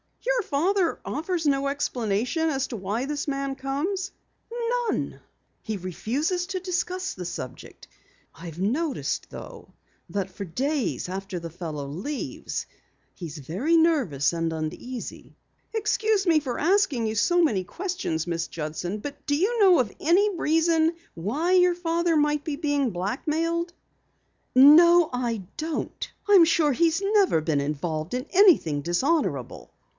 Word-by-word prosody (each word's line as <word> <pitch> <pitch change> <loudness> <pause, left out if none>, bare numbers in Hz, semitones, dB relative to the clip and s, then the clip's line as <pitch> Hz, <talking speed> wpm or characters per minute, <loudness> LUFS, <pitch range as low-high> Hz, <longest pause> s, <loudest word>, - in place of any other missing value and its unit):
"Your - - +2
father 350 +5 +1
offers 325 +2 -2
no 275 -1 +2
explanation 255 +2 -1
as 270 -3 -1
to 240 - -6
why 210 +5 -2
the 290 0 -3
man 275 -1 -2
comes?" 320 +9 -2 0.8
"None. - - -2 0.4
He 215 -1 -4
refuses 275 - -2
to 385 -1 -3
discuss 365 0 -2
the 180 - -7
subject. 130 -6 -8 0.5
I've 170 -1 -9
noticed, 270 - -1
though, - - -10 0.4
that 195 -2 -3
for 200 - -6
days 265 - -1
after 190 0 -5
the 165 -1 -7
fellow 155 -4 -5
leaves 195 - -4 0.5
he's 165 -3 -8
very 190 - 0
nervous 265 - +2
and 165 -1 -1
uneasy." 160 +11 -6 0.4
"Excuse 435 -2 +1
me 330 -3 +4
for 260 -5 -4
asking 295 - +2
so 350 +11 +3
many 210 - +1
questions, 350 - -3
Miss 170 -1 -2
Judson, 165 +5 -4
but 285 +7 -8
do 290 - +2
you 420 +10 +1
know 380 -4 +6
of 240 -5 0
any 385 +5 +3
reason 325 0 +2 0.2
why 280 - -1
your 360 -1 +5
father 340 -1 +1
might 295 0 +1
be 305 - -3
blackmailed?" 300 - -1 0.8
"No, 325 +5 +8
I 235 -5 -2
don't. 315 0 -4 0.2
I 410 - +4
am 360 -4 +9
sure 320 -3 +3
he's 330 +5 +2
never 395 - +3
been 155 -2 0
involved 155 - -3
in 255 +1 -3
anything 345 - +5
dishonorable." 175 - -1
285 Hz, 135 wpm, -25 LUFS, -, 0.8 s, am